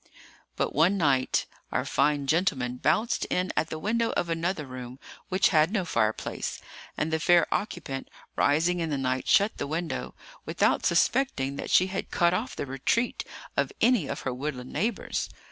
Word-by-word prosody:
But - - -1
one 170 +7 +3
night 140 -7 +2 0.3
our - - 0
fine 145 0 +1
gentleman 135 -6 +1
bounced 225 - +1
in 180 +1 -1
at 160 - 0
the 160 - -4
window 230 +7 0
of 170 - -1
another 165 -1 -1
room, 130 -1 -8 0.3
which 185 +1 +3
had 160 +1 +3
no 205 -5 0
fireplace; 110 -8 -1 0.4
and 160 +1 -1
the 160 - +2
fair 175 +1 +5
occupant, 160 -10 -4 0.3
rising 165 +5 +2
in 165 -1 -1
the 145 - -1
night, 130 -1 -1
shut 205 +2 +4
the 145 - -2
window, 165 +3 -3 0.3
without - - +1
suspecting 140 - +1
that - - -5
she 185 - +5
had 190 +1 -4
cut 170 -1 +2
off 220 +8 -2
the - - -3
retreat 135 - 0 0.3
of - - +1
any 235 - +3
of - - -4
her 130 - -2
woodland 130 -1 -5
neighbours. 220 0 -1
160 Hz, 170 wpm, -27 LUFS, 135-185 Hz, 0.4 s, fair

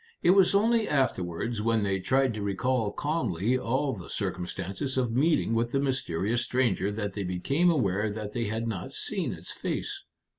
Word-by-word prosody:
It 175 - +6
was 195 0 +5
only 225 +2 +3
afterwards 110 - 0
when 115 -1 +2
they 95 -1 0
tried 130 +5 +2
to 110 - -5
recall 105 +3 0
calmly 125 - 0
all 130 +3 0
the 95 -6 -9
circumstances 95 +8 -3
of 125 -3 +1
meeting 150 -4 +2
with 115 +1 0
the 135 - +2
mysterious 120 -5 0
stranger 120 -6 +1
that 105 -1 -3
they 100 - -3
became 135 - +1
aware 105 - +1
that 105 0 -5
they 120 -2 -1
had 110 +2 -2
not 105 -6 -4
seen - - -2
its - - -6
face. - - -3
115 Hz, 175 wpm, -28 LUFS, 100-135 Hz, -, It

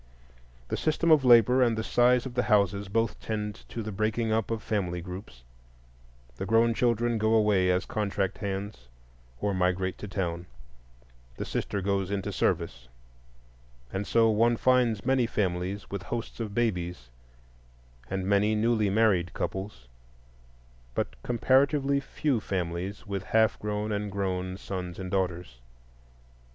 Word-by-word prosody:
The - - -1
system 160 +1 +1
of 155 -3 +6
labor 125 +1 +6
and 115 -3 +3
the 110 - -1
size 125 +2 +3
of 130 - -6
the 125 - +1
houses 100 -1 +2
both 115 +3 -1
tend 105 -2 -5
to 115 - -5
the 110 - -5
breaking 110 +3 -1
up 110 +1 0
of 115 -2 -3
family 90 -5 -1
groups: 90 - -9 0.9
the - - -3
grown 115 +2 +4
children 120 -1 +1
go 110 +1 +3
away 105 -4 +3
as 90 0 +1
contract 100 -2 -2
hands 100 - -5 0.5
or 105 -1 0
migrate 95 0 0
to 105 - -6
town, 90 -3 -3 0.9
the - - -4
sister 100 - -2
goes 100 -1 0
into 100 -1 -2
service; - - -1 1.1
and 100 +1 -3
so 115 -1 +4
one 115 +2 +3
finds 125 -4 +2
many 130 -2 +2
families 95 -1 -2
with 100 -1 -3
hosts 115 +4 -5
of 105 -3 -4
babies, 90 - -2 1.0
and 95 -1 -2
many 100 +2 +3
newly 110 -1 +2
married 95 -4 +2
couples, 95 -10 -5 1.1
but - - -2
comparatively 140 - +2
few 140 -2 -1
families 95 +1 -4
with 100 -2 -3
half 110 0 +2
grown 105 0 -2
and 105 -1 -2
grown 95 -2 -2
sons 90 -3 -5
and 95 -1 -6
daughters. 90 -8 -2
105 Hz, 140 wpm, -28 LUFS, 95-115 Hz, 1.1 s, of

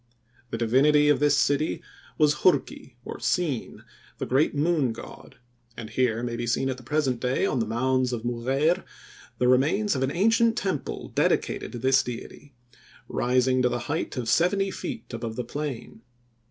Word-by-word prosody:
The 115 - -3
divinity 145 +6 +4
of 145 -3 +4
this 145 0 +3
city 145 +2 +1 0.3
was 150 -1 +3
Hurki, 140 -6 +1
or - - -7
Sin, 130 +2 -2 0.3
the - - -3
great 140 +4 +1
Moon 145 -5 +1
God, - - -11 0.4
and 115 -1 -7
here 120 -1 0
may 120 -1 -3
be 120 0 -4
seen 130 +3 0
at 130 - -5
the - - -12
present 135 -2 0
day 125 +1 0
on 130 - 0
the 115 - -1
mounds 130 +3 +1
of 115 -2 -4
Mugheir 130 +8 0 0.5
the 125 - +1
remains 150 +12 +3
of 130 - -2
an 135 - +1
ancient 225 - +2
temple 190 - -3
dedicated - - 0
to - - -5
this 130 +2 +3
deity, 125 +3 -9 0.5
rising 130 +1 +1
to 125 - +3
the 120 - -2
height 160 -3 -3
of 120 -2 -3
seventy 195 - +2
feet - - -7
above 115 -1 -5
the 125 - -3
plain. 140 -4 -6
130 Hz, 170 wpm, -26 LUFS, 120-150 Hz, 0.5 s, divinity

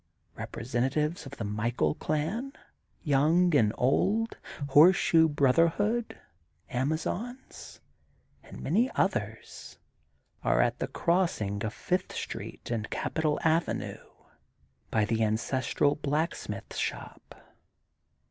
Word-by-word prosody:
Representatives 135 - -2
of 135 - -10
the 115 - -5
Michael 105 -6 0
Clan, 205 - -2 0.5
young 155 +4 +3
and 110 -7 +4
old, 210 - +1 0.3
Horseshoe 160 +2 +6
Brotherhood, 165 - +2 0.5
Amazons 160 - -4 0.6
and - - -11
many 220 - +2
others - - -2 0.7
are - - +2
at - - +2
the - - -1
crossing 165 - 0
of 110 - -2
Fifth 185 0 -2
Street - - -6
and 110 -2 -2
Capital 155 -2 -1
Avenue, 165 +1 0 0.9
by 110 -2 +2
the 115 +1 0
ancestral 130 +6 +1
Blacksmith 150 +3 -3
Shop. - - -6
150 Hz, 95 wpm, -29 LUFS, 120-175 Hz, 0.9 s, Horseshoe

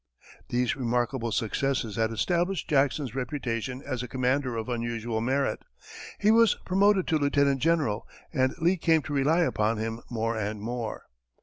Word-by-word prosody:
These 125 0 +1
remarkable 120 -1 -1
successes 115 0 -1
had 110 -1 +1
established 175 - 0
Jackson's 140 -3 +1
reputation 125 -1 -3
as 130 -4 -3
a 125 - -5
commander 130 0 0
of 110 - -4
unusual 115 -2 -2
merit; 135 +4 0 0.6
he 210 +1 +4
was 230 -2 +5
promoted 195 0 +3
to 160 - +2
lieutenant 140 -2 +2
general, 150 -10 +1 0.3
and 130 -3 +1
Lee 175 +2 +2
came 160 -2 +3
to 145 - -5
rely 145 +5 +3
upon 110 -8 +1
him 115 +1 -3
more 115 -1 -1
and 105 -1 -3
more. 115 +1 -4
130 Hz, 150 wpm, -27 LUFS, 115-150 Hz, 0.6 s, was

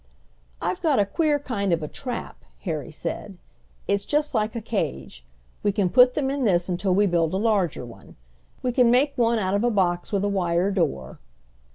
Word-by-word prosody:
"I've 180 - -2
got 310 -5 +2
a 205 - +4
queer 300 - +1
kind 210 -9 -2
of 165 -2 +1
a - - -3
trap," 245 - -6 0.2
Harry 160 -4 -4
said. 170 +5 -6 0.5
"It's 200 0 +1
just 295 +6 0
like 215 -1 0
a - - -1
cage. 65 - -4 0.4
We 205 - +2
can 195 -3 0
put 250 0 +6
them 270 -2 0
in 280 -1 -2
this 180 -5 +2
until 185 +1 0
we 205 +1 +4
build 170 -2 +1
a - - +1
larger 200 - 0
one. 120 - -14 0.5
We 250 - +1
can 245 -1 +4
make 270 +4 +3
one 235 -2 +2
out 190 -3 -1
of 200 +2 +1
a 240 - +3
box 180 -5 0
with 200 -2 0
a - - +1
wire 185 -1 +1
door." 150 - -2
200 Hz, 200 wpm, -24 LUFS, 175-240 Hz, 0.5 s, put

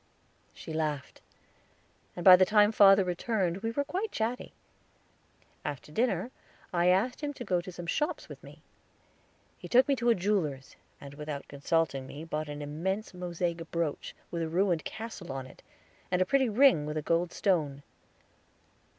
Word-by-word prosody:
She 160 - -9
laughed, 150 -3 -3 0.9
and 175 - -6
by 185 -1 +11
the 185 - +5
time 210 +2 +4
father 195 -2 +7
returned 180 0 -1
we 225 +3 -3
were 285 +5 -1
quite 390 +8 -3
chatty. 230 +3 -3 1.1
After 145 0 -6
dinner 225 +2 0 0.4
I 175 0 +2
asked 195 +10 +2
him 290 -1 -3
to 245 - -6
go 180 -5 0
to 185 - -9
some 175 -1 -8
shops 300 - -2
with - - -11
me. - - -14 1.0
He - - -8
took 255 +2 +5
me 280 - +3
to 240 0 +1
a 230 - +5
jeweler's, 175 -9 -1 0.2
and 140 0 -10
without 150 -1 -6
consulting 140 -2 -1
me 145 +4 -8
bought 155 -2 -4
an 145 0 -6
immense 190 +9 -3
mosaic 175 -2 -3
brooch, 165 -3 -3 0.2
with 170 - -3
a 165 - -2
ruined 175 -1 +1
castle 220 -7 -7
on 135 -1 -5
it, 130 - -15 0.5
and 180 - +1
a 185 - +3
pretty 265 +4 +2
ring 220 - +4
with 150 +1 -3
a 155 - -2
gold 170 +2 +1
stone. 150 -8 0
180 Hz, 170 wpm, -29 LUFS, 155-215 Hz, 1.1 s, by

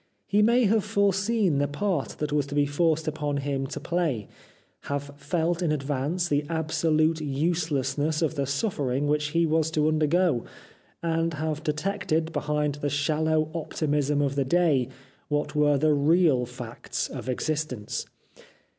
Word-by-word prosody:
He 205 +1 +2
may 235 +4 +4
have 215 0 +3
foreseen 200 -4 +1
the 145 - +2
part 170 +1 -2
that 150 -1 -2
was 145 -2 +1
to 145 - -5
be 145 0 +3
forced 160 +2 +1
upon 150 -2 -1
him 140 -1 -2
to - - -5
play; 165 - -1 0.6
have 145 0 -3
felt 165 +4 -1
in 170 -3 +1
advance 150 +4 -1
the 145 -2 +1
absolute 160 0 +1
uselessness 150 0 0
of 160 - +1
the 140 -3 -2
suffering 140 - -1
which 150 0 +1
he 165 +3 +1
was 160 0 +2
to 155 -1 +1
undergo; 155 -3 +2 0.6
and 165 -1 0
have 155 0 -2
detected 160 0 -1
behind 150 -1 0
the 145 - 0
shallow 155 +2 +1
optimism 150 -3 0
of 140 -1 0
the 140 -1 +1
day 145 -4 +2 0.4
what 150 0 -1
were 145 -1 +4
the 155 +2 +3
real 145 -3 +3
facts 120 -1 -5
of - - -7
existence. 135 -4 -2
150 Hz, 150 wpm, -26 LUFS, 145-165 Hz, 0.6 s, may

